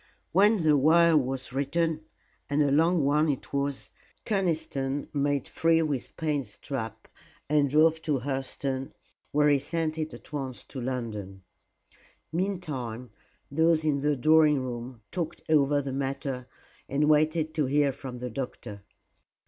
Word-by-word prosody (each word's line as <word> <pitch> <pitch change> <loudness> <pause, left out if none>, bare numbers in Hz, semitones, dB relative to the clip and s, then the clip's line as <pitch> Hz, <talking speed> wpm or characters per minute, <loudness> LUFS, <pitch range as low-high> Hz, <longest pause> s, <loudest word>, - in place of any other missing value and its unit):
When 205 +1 +4
the 155 -1 +5
wire 165 +4 +5
was 130 -2 -1
written 155 +3 0 0.4
and 145 +1 +3
a 140 - +1
long 165 +1 +3
one 150 +2 +3
it 140 -1 -3
was 140 -1 -2 0.3
Conniston 155 - -1
made 145 -2 0
free 165 0 +2
with 145 -5 -3
Payne's 145 -9 -2
trap 115 -6 -5 0.4
and 145 -1 +3
drove 160 +3 +4
to 150 -4 0
Hurseton, 135 0 -3 0.4
where 150 0 +3
he 145 -1 +4
sent 160 +2 -2
it 155 0 -2
at - - -13
once 135 -4 -4
to 130 - -7
London. 110 -7 -5 0.9
Meantime, 145 - -3 0.4
those 160 +2 +3
in 145 -3 +1
the 150 0 +1
drawing 150 0 +4
room 120 -2 -6
talked 170 -4 -4
over 145 -2 +3
the 135 -1 -4
matter 135 -1 -3 0.4
and 145 +2 +1
waited 155 +1 +2
to 150 -4 0
hear 145 +1 +3
from 130 -1 -8
the 125 0 -5
doctor. 110 -5 -6
145 Hz, 140 wpm, -28 LUFS, 130-155 Hz, 0.9 s, the